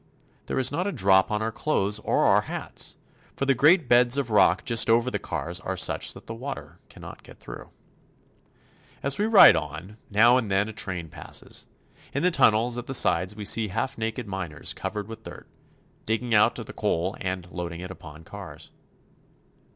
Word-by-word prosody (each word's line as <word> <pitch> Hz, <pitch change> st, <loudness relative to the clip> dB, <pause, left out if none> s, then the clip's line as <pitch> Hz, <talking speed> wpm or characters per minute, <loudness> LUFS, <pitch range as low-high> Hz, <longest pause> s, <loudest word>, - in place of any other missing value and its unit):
There -, -, -3 dB
is 130 Hz, -1 st, +2 dB
not 175 Hz, +7 st, -2 dB
a -, -, -1 dB
drop 95 Hz, -, +3 dB
on 105 Hz, 0 st, -1 dB
our 110 Hz, -, -2 dB
clothes 105 Hz, -5 st, -1 dB
or -, -, +1 dB
our -, -, +4 dB
hats, -, -, -6 dB, 0.4 s
for 135 Hz, -, -2 dB
the 135 Hz, -, +3 dB
great 150 Hz, +5 st, +4 dB
beds 120 Hz, +1 st, +4 dB
of 135 Hz, -5 st, -2 dB
rock 105 Hz, -, +3 dB
just 115 Hz, -2 st, +2 dB
over 120 Hz, +2 st, +3 dB
the -, -, -2 dB
cars 85 Hz, +1 st, -4 dB
are 95 Hz, -1 st, -5 dB
such -, -, +1 dB
that -, -, -13 dB
the 115 Hz, -, -7 dB
water 135 Hz, +5 st, -8 dB
cannot -, -, -12 dB
get -, -, -16 dB
through. -, -, -10 dB, 1.3 s
As 140 Hz, +4 st, -1 dB
we 210 Hz, -, +1 dB
ride 220 Hz, -, +8 dB
on, 80 Hz, +7 st, -6 dB
now 115 Hz, +4 st, +5 dB
and 115 Hz, -5 st, -2 dB
then 95 Hz, +2 st, +1 dB
a 110 Hz, -, -7 dB
train 90 Hz, -5 st, -3 dB
passes. -, -, -5 dB, 0.5 s
In 140 Hz, -, -1 dB
the 180 Hz, -, +3 dB
tunnels 120 Hz, -4 st, +3 dB
at 120 Hz, -, -9 dB
the 135 Hz, -, -1 dB
sides 95 Hz, -4 st, +1 dB
we 105 Hz, -1 st, -7 dB
see 110 Hz, +2 st, +2 dB
half 110 Hz, +7 st, -3 dB
naked 115 Hz, +1 st, -4 dB
miners 95 Hz, -6 st, -4 dB
covered 100 Hz, +1 st, -5 dB
with 115 Hz, 0 st, -9 dB
dirt, -, -, -11 dB, 0.6 s
digging 115 Hz, +2 st, -1 dB
out 105 Hz, -, +4 dB
the -, -, -8 dB
coal 90 Hz, +4 st, -1 dB
and 95 Hz, -1 st, -4 dB
loading 85 Hz, -1 st, -6 dB
it 90 Hz, +1 st, -7 dB
upon 80 Hz, -4 st, -12 dB
cars. -, -, -11 dB
110 Hz, 190 wpm, -25 LUFS, 95-125 Hz, 1.3 s, ride